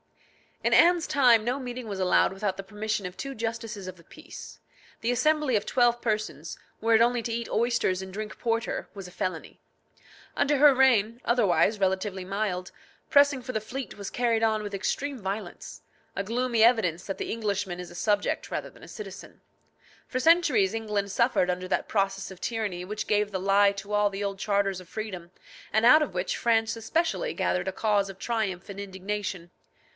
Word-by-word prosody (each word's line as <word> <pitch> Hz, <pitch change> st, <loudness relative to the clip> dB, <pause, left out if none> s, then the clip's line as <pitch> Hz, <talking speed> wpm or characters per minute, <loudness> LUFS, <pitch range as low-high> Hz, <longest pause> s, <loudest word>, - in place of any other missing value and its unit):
In 235 Hz, +1 st, +2 dB
Anne's 345 Hz, +4 st, +5 dB
time 245 Hz, -5 st, +5 dB
no 250 Hz, +4 st, -1 dB
meeting 250 Hz, -2 st, -6 dB
was 200 Hz, -2 st, -5 dB
allowed 185 Hz, +1 st, +3 dB
without 195 Hz, -1 st, -2 dB
the 195 Hz, -, -6 dB
permission 210 Hz, +1 st, -3 dB
of 180 Hz, -, -11 dB
two 275 Hz, 0 st, -5 dB
justices 225 Hz, -4 st, -5 dB
of 185 Hz, 0 st, -8 dB
the 170 Hz, -, -18 dB
peace. 310 Hz, -, -12 dB, 0.4 s
The 230 Hz, -, +1 dB
assembly 300 Hz, +1 st, +2 dB
of 205 Hz, -, 0 dB
twelve 240 Hz, -1 st, +2 dB
persons, 215 Hz, -2 st, -3 dB, 0.2 s
were 230 Hz, +1 st, +2 dB
it 220 Hz, -, +5 dB
only 240 Hz, 0 st, +3 dB
to 230 Hz, -, -3 dB
eat 235 Hz, 0 st, -3 dB
oysters 230 Hz, -5 st, +1 dB
and 190 Hz, 0 st, -8 dB
drink 215 Hz, +1 st, -6 dB
porter, 230 Hz, -1 st, -1 dB
was 195 Hz, -2 st, -7 dB
a -, -, -12 dB
felony. 185 Hz, 0 st, -4 dB, 0.8 s
Under 290 Hz, 0 st, +2 dB
her 290 Hz, 0 st, +7 dB
reign, 240 Hz, -4 st, +3 dB
otherwise 215 Hz, -2 st, +3 dB
relatively 190 Hz, 0 st, -1 dB
mild, 190 Hz, -2 st, -2 dB, 0.4 s
pressing 285 Hz, -2 st, +5 dB
for 255 Hz, +1 st, -6 dB
the 220 Hz, -, -1 dB
fleet 255 Hz, +5 st, -6 dB
was 200 Hz, -1 st, -5 dB
carried 235 Hz, -2 st, +1 dB
on 220 Hz, -1 st, +2 dB
with 205 Hz, -1 st, -6 dB
extreme 270 Hz, +7 st, -2 dB
violence 200 Hz, +2 st, -6 dB, 0.3 s
a 195 Hz, -, -1 dB
gloomy 235 Hz, +1 st, +1 dB
evidence 215 Hz, -8 st, +3 dB
that 195 Hz, -, -5 dB
the -, -, -3 dB
Englishman 205 Hz, -5 st, -2 dB
is 180 Hz, -, -7 dB
a -, -, -12 dB
subject 205 Hz, +2 st, 0 dB
rather -, -, -3 dB
than -, -, -18 dB
a -, -, -11 dB
citizen. -, -, -10 dB, 0.7 s
For 255 Hz, -, -2 dB
centuries 275 Hz, -, +4 dB
England 210 Hz, -3 st, -2 dB
suffered 235 Hz, -3 st, +2 dB
under 180 Hz, +1 st, -2 dB
that -, -, -1 dB
process 195 Hz, -1 st, -1 dB
of 185 Hz, -, -12 dB
tyranny 205 Hz, -6 st, -3 dB
which 210 Hz, +2 st, -5 dB
gave 210 Hz, 0 st, +1 dB
the 190 Hz, -, -2 dB
lie 200 Hz, +1 st, +4 dB
to 200 Hz, +1 st, -7 dB
all 210 Hz, 0 st, +3 dB
the 200 Hz, +1 st, -5 dB
old 200 Hz, -1 st, -3 dB
charters 195 Hz, -1 st, 0 dB
of 185 Hz, -1 st, -14 dB
freedom, 185 Hz, -6 st, -6 dB, 0.4 s
and 220 Hz, +2 st, +2 dB
out 305 Hz, +6 st, +8 dB
of 270 Hz, -, -6 dB
which 180 Hz, +1 st, -1 dB
France 225 Hz, -1 st, +1 dB
especially 330 Hz, -, -1 dB
gathered 180 Hz, +1 st, 0 dB
a -, -, 0 dB
cause 205 Hz, 0 st, +1 dB
of 195 Hz, -, -9 dB
triumph 210 Hz, -6 st, -2 dB
and 200 Hz, 0 st, -7 dB
indignation. 190 Hz, -2 st, -5 dB
215 Hz, 190 wpm, -27 LUFS, 195-235 Hz, 0.8 s, out